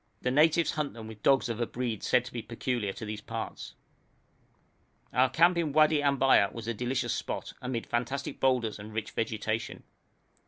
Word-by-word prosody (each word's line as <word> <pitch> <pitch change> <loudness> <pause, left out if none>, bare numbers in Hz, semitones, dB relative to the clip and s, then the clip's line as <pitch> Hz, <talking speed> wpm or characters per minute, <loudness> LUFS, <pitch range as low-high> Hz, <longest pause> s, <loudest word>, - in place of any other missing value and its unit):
The 125 - +1
natives 160 +4 +4
hunt 150 -2 -2
them 110 -1 -8
with 110 -1 -10
dogs 135 +1 +4
of 115 0 -3
a 120 - 0
breed 120 -4 -3
said 125 -1 +2
to 125 - -9
be 120 - -3
peculiar 115 -2 -2
to 110 - -7
these 105 0 -5
parts. - - -6 1.4
Our 130 +2 +4
camp 170 +6 +4
in 155 -4 -1
Wadi 155 0 +5
Ambaya 135 -7 +4
was 115 -1 -8
a 115 - 0
delicious 120 +1 -1
spot, - - -4
amid 125 -2 -3
fantastic 125 +4 -3
boulders 125 -5 +1
and 105 +1 -9
rich 110 -1 -3
vegetation. 110 0 -3
120 Hz, 180 wpm, -29 LUFS, 110-135 Hz, 1.4 s, Wadi